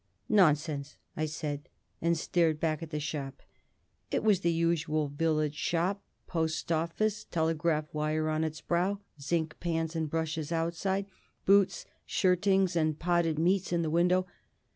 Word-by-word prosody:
"Nonsense!" 150 -7 +2 0.2
I 155 - -1
said, 150 -2 -4 0.3
and 170 0 +2
stared 160 -1 +1
back 155 -2 0
at 165 - -6
the 150 -1 -3
shop. 145 -2 -5 0.7
It - - 0
was 210 -4 +4
the 170 -2 +1
usual 165 -2 +1
village 155 0 0
shop, 175 +6 0 0.2
post 160 -1 -2
office, 170 +6 0
telegraph 160 -1 0
wire 155 +1 0
on 155 0 0
its 155 -1 -3
brow, 185 +4 0 0.2
zinc 160 +2 -1
pans 165 -1 -1
and 160 -2 -1
brushes 160 0 -2
outside, 170 +4 0 0.4
boots, 200 0 +4 0.2
shirtings, 190 0 +2
and 155 -2 +1
potted 170 -2 +1
meats 180 +4 +2
in 170 -1 +1
the 155 - -1
window. 180 +2 +3
165 Hz, 140 wpm, -30 LUFS, 155-175 Hz, 0.7 s, was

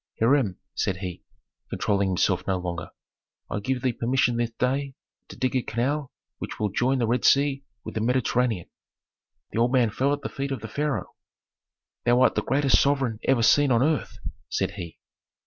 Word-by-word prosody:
"Hiram," 115 -5 +3 0.2
said 95 - -1
he, 90 -2 -6 0.5
controlling 100 -2 0
himself 90 - +1
no 95 -1 +1
longer, 85 -2 -5 0.6
"I 105 - -1
give 125 +4 -2
thee 130 -2 +1
permission 125 +1 +1
this 120 -1 0
day 135 +3 -1 0.3
to - - -11
dig 130 0 -1
a 130 - +3
canal 130 +5 -2 0.3
which - - -5
shall 105 -1 0
join 125 +7 +1
the 120 - +1
Red 120 +2 0
Sea 140 0 +3 0.2
with - - -7
the 110 - -2
Mediterranean." 120 -4 +1 0.8
The - - -2
old 120 +1 +3
man 125 -4 +3
fell 135 +6 +1
at 145 0 -1
the - - -3
feet 140 0 -4
of 135 - -3
the 115 - -6
pharaoh. 145 +5 -2 0.9
"Thou 120 +1 +4
art 130 - +5
the - - 0
greatest 135 +1 +3
sovereign 135 -6 +1
ever 130 -3 +3
seen 145 +4 +5
on 120 +1 +4
earth," 155 -3 0 0.3
said - - -1
he. 85 -2 -8
125 Hz, 180 wpm, -25 LUFS, 110-135 Hz, 0.9 s, art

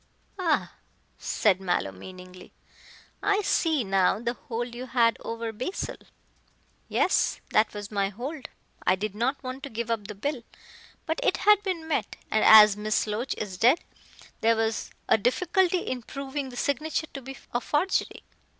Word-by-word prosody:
"Ah!" 335 -5 +1 0.5
said 195 -3 +1
Mallow 175 - 0
meaningly, 180 - -12 0.7
"I 415 0 +2
see 320 -8 +2
now 195 -2 +2
the 235 +1 -2
hold 240 0 -5
you 250 +2 -6
had 235 -2 +3
over 230 0 -5
Basil." 255 - -4 0.9
"Yes, - - +2
that 215 +1 +3
was 205 0 -6
my 200 -1 0
hold. 260 +8 -6 0.3
I - - +4
did 205 +1 -4
not 255 +7 -1
want 255 +1 -6
to 280 - -6
give 230 0 -3
up 215 -3 -2
the 210 - -7
bill. 265 +5 -3 0.6
But 320 - -1
it - - +2
had 420 -1 +5
been 365 -5 -3
met, 285 -8 -1 0.2
and 215 - +2
as 215 -2 +9
Miss 215 +1 0
Loach 220 +5 -2
is 190 -4 -5
dead, 255 +7 +6 0.6
there 230 +1 +3
was 220 -1 -1 0.2
a - - +4
difficulty 355 - +2
in 255 -1 -4
proving 275 +2 -5
the 245 - -10
signature 305 +4 -1
to 275 - -6
be 270 +1 -9 0.2
a 240 - 0
forgery. 305 +10 0
235 Hz, 160 wpm, -27 LUFS, 210-285 Hz, 0.9 s, as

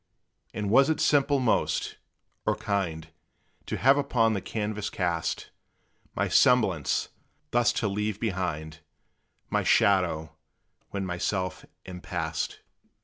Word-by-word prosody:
And 105 -1 -3
was 135 +5 +6
it 160 - +1
simple 140 -1 +3
most, 125 -4 0 0.5
or 105 - +3
kind 95 -7 -2 0.6
To - - -2
have 135 +3 +5
upon 120 -5 +2
the 100 - -2
canvass 105 -1 -3
cast 85 -3 -2 0.6
My - - 0
semblance, 100 - +3 0.4
thus 120 0 +3
to 110 - -1
leave 105 +1 -2
behind 85 -7 -3 0.7
My - - +2
shadow, 85 -6 +2 0.6
when 100 -1 -3
myself 90 +1 -2 0.2
am 90 -1 -8
past? 80 -4 -3
100 Hz, 115 wpm, -27 LUFS, 90-115 Hz, 0.7 s, was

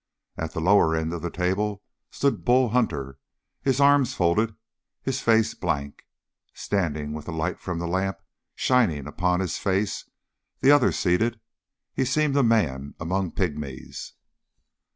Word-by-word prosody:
At 80 0 -5
the - - -3
lower 90 -2 +4
end 80 +1 -2
of 85 - -4
the 85 - -3
table 95 +3 -1 0.3
stood 140 -1 0
Bull 125 0 +4
Hunter, 70 - -1 0.4
his 135 -1 +1
arms 140 -2 +4
folded, 105 +5 +1 0.5
his 135 0 -2
face 115 -1 +3
blank. 70 -5 -4 0.5
Standing 75 -7 -2
with 75 -1 -7
the - - -5
light 80 +3 -2
from 90 -2 -4
the 85 - -3
lamp 95 +2 -1 0.4
shining 105 - +2
upon 90 +4 0
his 90 -4 -2
face, 100 +1 -1 0.5
the 135 - +5
others 145 -3 +4
seated, 110 +6 +1 0.5
he 135 - 0
seemed 140 +2 +1
a 140 - +5
man 75 - +1
among 90 +2 -2
pygmies. 75 -7 -4
95 Hz, 145 wpm, -25 LUFS, 80-115 Hz, 0.5 s, the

